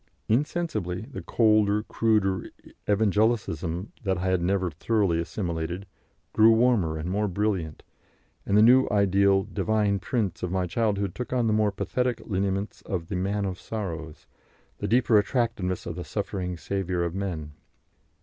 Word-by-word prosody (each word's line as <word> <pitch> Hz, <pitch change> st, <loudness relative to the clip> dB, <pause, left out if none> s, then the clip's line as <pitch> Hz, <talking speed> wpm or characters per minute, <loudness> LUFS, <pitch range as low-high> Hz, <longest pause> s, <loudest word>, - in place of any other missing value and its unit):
Insensibly, 110 Hz, -, -1 dB
the 125 Hz, +6 st, -8 dB
colder, 105 Hz, -2 st, +3 dB
cruder 105 Hz, -5 st, +1 dB, 0.4 s
Evangelicalism 105 Hz, -4 st, +1 dB
that 95 Hz, -3 st, 0 dB
I 90 Hz, +1 st, -1 dB
had 95 Hz, -1 st, +1 dB
never 90 Hz, 0 st, 0 dB
thoroughly 95 Hz, +1 st, +1 dB
assimilated, 85 Hz, +1 st, -3 dB, 0.5 s
grew 110 Hz, +1 st, +6 dB
warmer 110 Hz, -9 st, +2 dB
and 80 Hz, +2 st, -4 dB
more 105 Hz, +3 st, 0 dB
brilliant, 95 Hz, -5 st, -2 dB, 0.6 s
and 100 Hz, -, +1 dB
the 125 Hz, +5 st, +6 dB
ideal 100 Hz, -1 st, +3 dB
Divine 105 Hz, 0 st, 0 dB
Prince 105 Hz, -3 st, -2 dB
of 90 Hz, -, -3 dB
my 95 Hz, -1 st, 0 dB
childhood 100 Hz, -1 st, -1 dB
took 125 Hz, -, -6 dB
on 125 Hz, -2 st, +1 dB
the 110 Hz, -, +2 dB
more 105 Hz, -1 st, +2 dB
pathetic 125 Hz, +4 st, -1 dB
lineaments 100 Hz, 0 st, -2 dB
of 85 Hz, -5 st, -4 dB
the 100 Hz, -, -2 dB
Man 100 Hz, +2 st, -1 dB
of 95 Hz, -2 st, -4 dB
Sorrows, 80 Hz, -8 st, -6 dB, 0.5 s
the -, -, -2 dB
deeper 120 Hz, -2 st, +4 dB
attractiveness 105 Hz, -5 st, -1 dB
of 85 Hz, -, -5 dB
the 90 Hz, -, -5 dB
suffering 95 Hz, -3 st, -4 dB
Saviour 90 Hz, +2 st, -2 dB
of 85 Hz, -1 st, -2 dB
Men. 90 Hz, -6 st, -4 dB
100 Hz, 145 wpm, -26 LUFS, 90-110 Hz, 0.6 s, grew